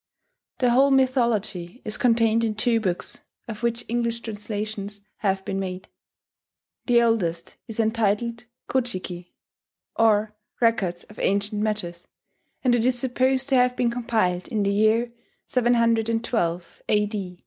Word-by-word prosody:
The 250 -2 +2
whole 270 +3 +5
mythology 235 -7 +1
is 215 - -3
contained 230 -1 +3
in 220 -2 0
two 230 +1 +2
books, 185 -5 -3 0.3
of 215 -1 -7
which 235 0 -1
English 235 0 -1
translations 210 -2 -5 0.2
have 190 -2 -1
been 195 0 -2
made. 185 0 -5 1.0
The 240 -1 +5
oldest 175 -8 -1
is 225 -1 -7
entitled 230 +1 0 0.2
Ko 260 - +1
ji 240 -6 -4
ki, 175 -1 -9 0.6
or 215 -1 +3 0.3
"Records 195 -7 +1
of 210 - -15
Ancient 205 +2 0
Matters"; 180 -5 -3 0.6
and 250 -2 +3
it 240 -2 +2
is 250 0 +2
supposed 260 +1 +1
to 270 - +3
have 250 0 +3
been 240 -2 +1
compiled 220 -7 0
in 215 -2 -1
the 200 0 +1
year 220 +3 +2 0.4
712 230 -7 +1
A. 205 -4 -1
220 Hz, 135 wpm, -24 LUFS, 200-235 Hz, 1.0 s, whole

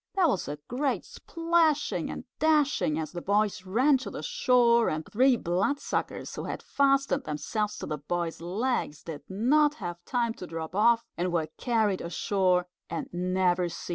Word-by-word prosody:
There 375 -3 +4
was 220 - 0
a 145 - -4
great 265 +3 -1
splashing 330 -3 0
and - - -6 0.2
dashing 295 - +2
as 155 -2 -3
the 175 - -6
boys 205 -1 0
ran 260 +8 +3
to 260 - -6
the - - -7
shore, 250 - +3
and 155 0 -3
three 255 +3 +3
Bloodsuckers, 195 +12 -2
who - - -5
had - - -5
fastened 275 0 +2
themselves 210 +8 -2
to - - -5
the 150 -2 -4
boy's 165 +2 -3
legs, 190 - -2
did 155 -3 -7
not 290 +10 +3
have 175 - -6
time 235 0 0
to 180 - -5
drop 165 0 -6
off, 230 +3 +4
and 180 +1 -1
were 160 -3 0
carried 220 -5 +1
ashore 180 +1 +1 0.2
and 165 - -4
never 180 0 +1
seen 170 - -7
again. - - -9
205 Hz, 170 wpm, -28 LUFS, 175-270 Hz, 0.2 s, There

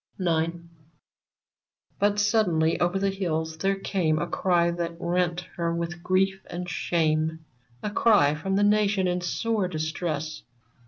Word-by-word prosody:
IX. 165 -2 +1 1.5
But 205 0 +2
suddenly 185 -7 +2
over 175 +2 +1
the 195 0 +1
hills 160 -4 -2
there 195 +3 +1
came 180 -5 0
A 170 - 0
cry 175 -1 +1
that 170 -1 -4
rent 175 0 0 0.2
her 170 -1 0
with 170 +1 -4
grief 190 +2 +1
and 180 +1 -5
shame 160 -1 0 0.2
— 120 -1 -33
A 210 - -2
cry 205 -10 +4
from 190 +6 -2
the 205 - +3
Nation 205 -2 +3
in 180 0 0
sore 210 +3 -1
distress. 155 -2 -3
175 Hz, 145 wpm, -26 LUFS, 160-195 Hz, 1.5 s, cry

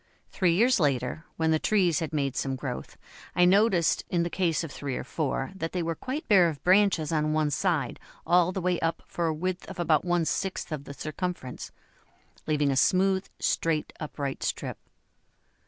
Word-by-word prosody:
Three 180 -3 +2
years 235 +5 +4
later, 140 0 0
when 160 0 +2
the 155 - +3
trees 180 -6 +2
had 160 -2 -3
made 140 -4 -1
some 135 -1 -1
growth, 130 -2 -6 0.4
I 180 - +5
noticed 190 -3 +3
in 175 -2 +1
the 170 - -3
case 170 -4 0
of 165 - -6
three 140 -2 -4
or - - -4
four 135 -3 -2
that 165 -4 -5
they 180 -2 -1
were 165 0 -1
quite 265 - -5
bare 185 -6 +6
of 150 -3 -8
branches 185 -4 +3
on 155 -1 +1
one 155 -1 +1
side 165 +1 0 0.3
all 175 0 +4
the 190 - -3
way 180 0 +1
up 165 0 -1
for 170 -1 -2
a 160 - +1
width 185 +3 -3
of 190 - -8
about 160 -3 +2
one 175 -2 +1
sixth 190 +2 -2
of 145 -2 -4
the 140 - -8
circumference, 155 -4 -5 0.8
leaving 150 -2 +2
a - - 0
smooth, 190 +6 +3
straight, 160 -2 0
upright 140 -3 -4
strip. - - -3
165 Hz, 190 wpm, -27 LUFS, 150-185 Hz, 0.8 s, bare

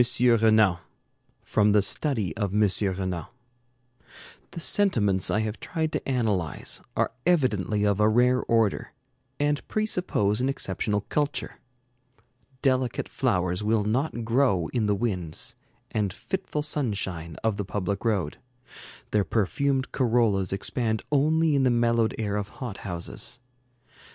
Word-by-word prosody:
RENAN 110 -6 +4 0.7
From 105 0 +2
the 105 - +5
'Study 110 - 0
of 100 -2 -2
M. 105 0 +5 0.3
Renan' 90 -3 -3 1.2
The - - -8
sentiments 115 - +2
I 110 - +1
have 110 0 -3
tried 160 -2 -2
to - - -3
analyze 105 - -1 0.2
are - - +1 0.2
evidently 110 - +2
of 100 -1 +2
a 105 0 +5
rare 125 +3 +3
order, 115 -3 +1 0.5
and 145 0 0
presuppose 180 - 0
an 130 - +1
exceptional 105 -4 -1
culture. 145 +7 -2 1.0
Delicate 130 -3 +1
flowers 90 +2 0
will 110 0 +2
not 120 +2 -1
grow 115 -8 +2
in 115 -4 0
the 105 - +2
winds 95 -7 -2 0.4
and 105 -3 0
fitful 150 - -4
sunshine 100 - -2
of 110 -2 +1
the 100 - -2
public 100 +1 -3
road. 100 -10 -1 0.7
Their 105 -1 +3
perfumed 130 - 0
corollas 115 -7 +2
expand 110 +2 -1
only 155 +2 +3
in 140 - +3
the 130 - +3
mellowed 115 -1 +2
air 105 -2 -1
of 105 0 -3
hot 125 -8 -5
houses. 90 +6 -4
110 Hz, 130 wpm, -26 LUFS, 100-130 Hz, 1.2 s, the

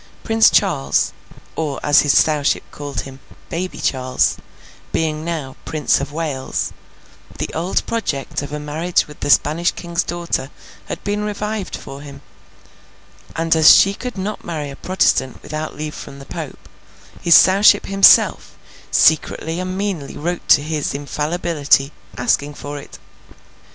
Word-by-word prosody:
Prince 225 0 +4
Charles—or 135 - -1
as 145 -1 +5
his 145 - +3
Sowship 150 -2 +2
called 145 -1 -5
him, 135 0 -11 0.3
Baby 185 +2 -4
Charles—being 155 +4 -2
now 160 -6 -4
Prince 150 -3 0
of 140 +1 -5
Wales, 150 -4 -3 0.6
the - - -4
old 170 +4 -1
project 150 -10 -3
of 145 - -7
a 150 - -4
marriage 155 +4 0
with 150 - -14
the - - -3
Spanish 160 +5 +3
King's 170 0 -3
daughter 170 -5 -3 0.4
had - - -6
been 205 +1 -2
revived 210 -1 -4
for 135 +1 -9
him; 140 -1 -11 1.1
and 165 0 +1
as 160 -1 +8
she 195 - +4
could 250 +2 -7
not 200 +3 -4
marry 150 -4 -5
a - - -9
Protestant 135 -7 0
without 155 0 -5
leave 155 0 -5
from 140 -1 -9
the 140 - -11
Pope, - - -8 0.5
his 170 - +6
Sowship 200 +2 +6
himself 195 -1 +4 0.3
secretly 160 +2 +2
and 185 0 -4
meanly 195 -8 -3
wrote 175 +3 -4
to 145 - +5
his 155 -2 -2
Infallibility, 150 -1 0 0.3
asking 145 +4 0
for 145 0 -7
it. - - -12
155 Hz, 140 wpm, -19 LUFS, 145-175 Hz, 1.1 s, as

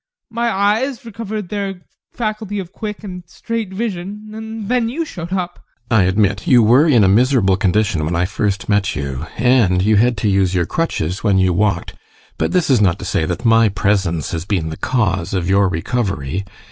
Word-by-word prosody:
My 235 +1 0
eyes 225 +6 0
recovered 215 -3 -6
their 195 -3 -4 0.3
faculty 215 -3 -3
of 185 -3 -5
quick 210 +1 -6
and 180 -3 -7
straight 225 +2 -4
vision 205 0 -5
and 220 -1 -6
then 240 -1 +1
you 325 +7 -3
showed 170 - -7
up. 180 -2 -3 0.3
GUSTAV. 110 - +5
I - - +5
admit 100 - +1
you 125 -7 +6
were 125 +9 +5
in 120 -8 +5
a - - +5
miserable 110 -1 +3
condition 95 -3 +1
when 80 +3 -1
I 85 +1 +1
first 100 0 -2
met 100 -1 +1
you, 70 +1 -4
and 110 -7 +3
you 105 +1 +3
had 120 +2 +3
to 105 - -1
use 95 -2 +2
your 85 -1 +2
crutches 100 - -2
when 100 -3 +3
you 95 -1 +3
walked, 95 -1 0 0.5
but - - 0
this 180 -3 +1
is 125 -5 +4
not 90 -4 +3
to - - -8
say 80 - 0
that 120 - -4
my 115 -1 +5
presence 95 -5 0
has 80 -1 -3
been 90 -5 -1
the - - -5
cause 100 -8 -1
of 90 -2 -1
your 100 0 +3
recovery. 95 - -2
115 Hz, 195 wpm, -18 LUFS, -, 0.5 s, you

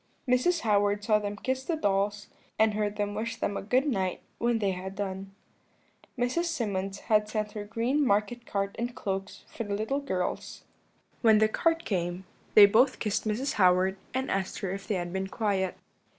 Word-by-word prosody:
"Mrs. 255 +8 +2
Howard 205 -1 +2
saw 210 0 +3
them 205 0 -4
kiss 260 +4 -2
the 330 - -1
dolls, 205 -5 0 0.3
and 220 -1 +4
heard 210 0 -1
them 205 -1 -2
wish 225 +2 -3
them 200 - -2
a - - -2
good 250 +7 +2
night 190 -8 -1 0.2
when 235 0 +2
they 200 -3 +1
had 190 +1 -6
done. 195 -1 -4 0.9
"Mrs. 250 +8 0
Symonds 200 - -2
had 210 -1 +2
sent 215 -1 -2
her 210 -1 -5
green 235 +7 0
market 210 +1 +1
cart 200 -1 -2
and 240 +1 -3
cloaks 195 -2 -4
for 230 - -5
her 205 0 -2
little 220 +7 -1
girls. 185 -11 -3 0.6
When 220 -2 +6
the 215 0 +5
cart 330 +8 +1
came 180 -1 -2 0.3
they 210 - +11
both 240 +6 +4
kissed 210 0 -1
Mrs. 240 +6 -1
Howard, 185 +1 +4 0.2
and 260 +1 -2
asked 195 -1 -2
her 190 - -2
if 195 0 -6
they 210 - 0
had 175 -1 -3
been 190 0 -2
quiet. 195 -3 -1
210 Hz, 185 wpm, -28 LUFS, 195-235 Hz, 0.9 s, they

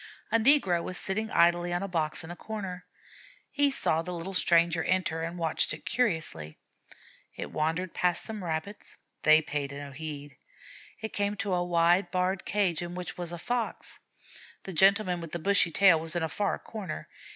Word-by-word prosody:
A 230 - +4
negro 220 - +4
was 180 +1 -6
sitting 220 +3 -2
idly 175 +1 +3
on 175 +2 -1
a - - -2
box 160 -3 -1
in 160 - -8
a - - -6
corner. 190 -3 -6 0.6
He 285 -1 +3
saw 165 - +1
the 180 +2 -6
little 170 +3 -5
stranger 170 -2 +3
enter 180 -3 0
and 165 +2 -4
watched 165 -2 0
it - - -16
curiously. 160 - -1 0.8
It - - -6
wandered 165 +4 -1
past 180 -1 +1
some 215 -3 -6
Rabbits. 170 +5 -5 0.3
They 155 0 +6
paid 145 -2 -3
no 140 0 -7
heed. 145 0 -7 0.6
It 220 - -5
came 205 0 0
to 200 -2 -2
a 175 0 +1
wide 175 +1 +3
barred 185 +1 -1
cage 190 -6 +1
in 175 0 -5
which 180 -2 -6
was 175 -1 -5
a 175 - -5
Fox. 240 +6 -2 0.6
The 190 - -7
gentleman 190 +1 +3
with 165 -2 -9
the - - -1
bushy 185 +1 +3
tail 170 0 +5
was 160 0 +2
in 175 - 0
a - - +1
far 205 +4 -1
corner. 200 -8 -7
175 Hz, 185 wpm, -29 LUFS, 165-195 Hz, 0.8 s, They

